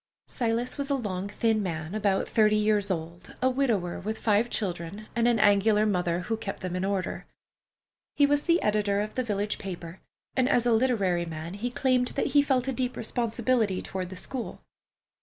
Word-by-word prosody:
Silas 235 +2 -1
was 280 0 -2
a 280 - +2
long, 200 -6 -3
thin 220 +1 +1
man 165 -2 -4
about 200 -2 +1
thirty 215 -1 +3
years 210 -1 +2
old, 170 0 -5
a 255 - +2
widower 230 -10 0
with 220 +3 -4
five 220 +2 +2
children, 185 0 -3
and 235 0 +3
an 240 -1 +3
angular 210 +1 +4
mother, 180 -4 0
who 225 +5 -2
kept 220 -3 -6
them 185 -1 -3
in 185 - -1
order. 195 -1 -2 0.9
He 285 - +5
was 290 +1 +1
the 340 0 +4
editor 205 -1 +1
of 210 +1 -4
the 255 - -1
village 205 -2 -2
paper, 175 -2 -7 0.4
and 260 0 +2
as 245 -3 +3
a 240 - +4
literary 205 -8 +2
man 165 +1 -6
he 215 +5 -3
claimed 250 0 +1
that - - +1
he 290 - +7
felt 265 -3 +1
a 265 - 0
deep 255 0 -2
responsibility 230 -3 0
toward 185 -2 -5
the 185 - -8
school. 250 +6 -5
210 Hz, 190 wpm, -27 LUFS, 190-245 Hz, 0.9 s, he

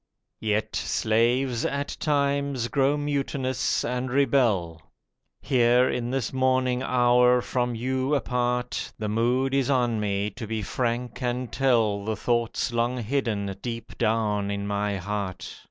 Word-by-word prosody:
Yet 105 0 -1
slaves, 120 +3 +1
at 140 0 -2
times, 140 -4 0
grow 140 +1 +2
mutinous 135 -2 -1
and 125 +1 -2
rebel. 115 - +1 0.6
Here 125 -1 +4
in 120 -2 -2
this 130 -2 -2
morning 130 -1 +1
hour, 125 -1 +4
from 125 -1 -1
you 130 +4 0
apart, 125 -2 -1
The 110 -2 -3
mood 125 +5 +1
is 135 -1 +1
on 120 -4 +2
me 100 0 -1
to 115 +2 -7
be 110 -1 -3
frank 120 +4 -2
and 125 -1 -2
tell 115 -6 +2
The 110 +1 -2
thoughts 120 +2 -1
long 120 +2 0
hidden 105 -6 -1
deep 115 -1 -6
down 105 -2 +1
in 100 0 -3
my 100 0 -1
heart. 100 0 -5
120 Hz, 135 wpm, -26 LUFS, 110-130 Hz, 0.6 s, Here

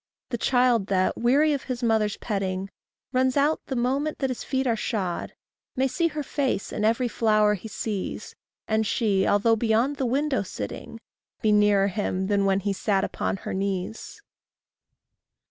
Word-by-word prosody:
The 240 - -2
child 245 -5 +3
that, 185 -1 +1
weary 285 +6 +3
of 280 - -3
his 250 -1 -4
mother's 220 -3 +1
petting, 195 -2 -3 0.4
Runs 255 +1 +2
out 295 +3 +2
the 265 - -3
moment 270 +5 0
that 270 -2 -1
his 250 - -5
feet 265 0 -1
are 235 -3 +2
shod, 200 -5 -3 0.4
May 265 0 +2
see 335 +6 +1
her 300 -2 -4
face 270 -7 -2
in 210 - -2
every 230 +3 +2
flower 215 -2 +3
he 210 +2 -6
sees, 210 -2 -4 0.3
And 220 0 +1
she, 200 -3 +1
although 215 +3 +3
beyond 230 +5 +1
the 265 - 0
window 275 +1 +1
sitting, 185 - -7 0.4
Be 215 - +4
nearer 205 -1 +4
him 190 -1 -2
than 200 0 +1
when 195 0 +2
he 200 +1 -1
sat 195 0 0
upon - - -2
her - - -3
knees. 195 +2 -4
220 Hz, 165 wpm, -25 LUFS, 200-255 Hz, 0.4 s, Be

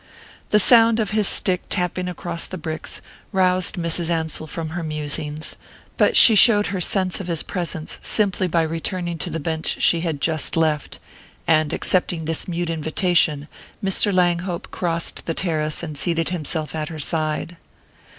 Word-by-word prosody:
The 210 - +4
sound 230 +1 +5
of 215 -2 -1
his 215 -2 +1
stick 180 -1 0
tapping 180 0 -2
across 170 -1 -4
the 185 - -7
bricks 160 -1 -6 0.3
roused 185 -2 +2
Mrs. 170 -1 -1
Ansell 160 -1 -2
from 160 0 -5
her 175 +2 -5
musings, 150 -1 -4 0.4
but - - +3
she 230 - +9
showed 210 0 +6
her 185 - -2
sense 185 0 -1
of 190 - -6
his 165 -3 -1
presence 170 -3 -5
simply 195 -3 +3
by 170 -1 +1
returning 170 +1 -3
to 175 - -1
the 165 0 -4
bench 160 +1 -2
she 170 - +4
had 165 -4 -3
just 160 +1 0
left; 155 -3 0 0.5
and 155 -2 +2
accepting 175 -3 +1
this 165 0 -2
mute 175 -1 -2
invitation, 160 -2 +1 0.4
Mr. 195 +2 +2
Langhope 175 -1 0
crossed 170 -2 -2
the 165 - -2
terrace 155 -3 -1
and 155 -3 -6
seated 165 +1 0
himself 155 -3 -3
at 155 0 -4
her 160 - -7
side. 155 +2 -3
170 Hz, 160 wpm, -21 LUFS, 160-180 Hz, 0.5 s, she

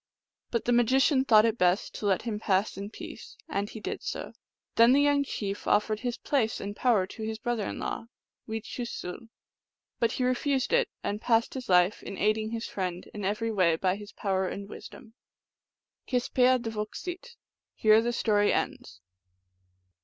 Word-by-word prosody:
But 235 - -1
the 245 - +2
magician 260 +3 +4
thought 215 -3 +6
it 230 0 0
best 180 +2 +2
to 210 - -2
let 190 -2 +2
him 220 -3 -3
pass 195 -1 +1
in 200 +2 -6
peace; - - -10
and 205 -10 -2
he 220 - -8
did - - -4
so. - - -5 0.4
Then 230 +2 +6
the 280 - +5
young 285 -1 +3
chief 205 -7 -4
offered 210 0 +2
his 245 -1 -3
place 235 -6 0
and 205 +1 -5
power 225 -7 +3
to 220 - -10
his 220 0 -3
brother 230 -2 -2
in - - -5
law 225 - -4 0.4
(wechoosul); 225 -1 -5 0.7
but 230 0 +2
he 255 - -1
refused 260 - 0
it, - - +3
and 210 +1 -2
passed 230 -1 +2
his 260 -5 -6
life 180 +2 +4
in 195 - -7
aiding 215 +1 +1
his 230 0 -4
friend 180 -2 -4
in 210 - -6
every 215 +4 -1
way 180 -6 +3
by 185 +3 +1
his 205 0 -10
power 190 -2 -1
and 200 +2 -5
wisdom. 220 +1 -11 0.9
Kespeahdvoksit 250 - 0 0.4
(here 215 0 +5
the 240 +1 0
story 210 -3 +2
ends). 90 +1 -3
220 Hz, 170 wpm, -28 LUFS, 200-245 Hz, 0.9 s, thought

